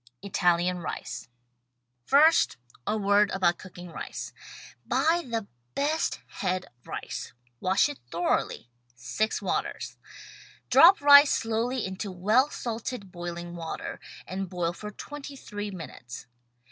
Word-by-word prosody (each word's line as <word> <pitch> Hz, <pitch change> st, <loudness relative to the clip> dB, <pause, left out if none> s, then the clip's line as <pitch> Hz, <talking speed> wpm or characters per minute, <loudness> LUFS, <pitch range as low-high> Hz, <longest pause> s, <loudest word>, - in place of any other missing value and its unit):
ITALIAN 180 Hz, -2 st, +2 dB
RICE 165 Hz, -, -5 dB, 0.8 s
First, 310 Hz, -, +5 dB, 0.3 s
a 215 Hz, -, +1 dB
word 205 Hz, 0 st, +4 dB
about 175 Hz, -3 st, +2 dB
cooking 180 Hz, -1 st, -10 dB
rice. -, -, -6 dB, 0.5 s
Buy 330 Hz, +2 st, +2 dB
the 225 Hz, -2 st, -2 dB, 0.3 s
best 305 Hz, +3 st, 0 dB
head 185 Hz, -1 st, -2 dB, 0.2 s
rice. -, -, -6 dB, 0.3 s
Wash 190 Hz, +7 st, +3 dB
it 290 Hz, -2 st, -7 dB
thoroughly, 165 Hz, -7 st, -1 dB, 0.2 s
— -, -, -43 dB
six 125 Hz, -, -1 dB
waters. -, -, -2 dB, 0.7 s
Drop 355 Hz, +1 st, +8 dB
rice 285 Hz, 0 st, +9 dB
slowly 230 Hz, +2 st, 0 dB
into 190 Hz, +1 st, -4 dB
well 215 Hz, +10 st, +3 dB
salted, 230 Hz, -5 st, -5 dB
boiling 175 Hz, 0 st, -6 dB
water, 165 Hz, -1 st, -5 dB, 0.3 s
and 190 Hz, 0 st, -4 dB
boil 175 Hz, -1 st, -1 dB
for 210 Hz, +4 st, -7 dB
twenty 285 Hz, +6 st, -8 dB
three 205 Hz, -5 st, -6 dB
minutes. 125 Hz, -10 st, -8 dB
200 Hz, 120 wpm, -28 LUFS, 175-250 Hz, 0.8 s, rice